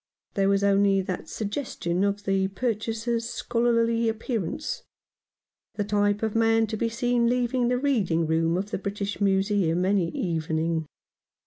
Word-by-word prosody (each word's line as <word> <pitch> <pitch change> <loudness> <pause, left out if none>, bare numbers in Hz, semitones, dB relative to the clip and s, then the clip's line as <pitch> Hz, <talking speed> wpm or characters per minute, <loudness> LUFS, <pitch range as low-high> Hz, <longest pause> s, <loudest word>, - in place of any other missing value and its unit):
There 195 -1 +2
was 200 0 +2
only 200 -1 +4
that 185 -1 -5
suggestion 205 -5 -2
of 200 0 0
the 195 -1 +1
purchaser's 230 +2 -2
scholarly 230 -1 +1
appearance 225 -4 -3 0.5
— - - -55
the 205 - -1
type 205 0 +1
of 220 -1 0
man 225 0 +3
to - - +2
be 230 +2 0
seen 240 0 +1
leaving 245 0 +1
the 250 +1 +2
Reading 210 - +1
room 165 +2 +1
of 200 +3 -3
the - - -2
British 200 +1 -4
Museum 195 -3 +2
any 190 -3 +2
evening. 160 -1 -1
205 Hz, 145 wpm, -26 LUFS, 190-230 Hz, 0.5 s, only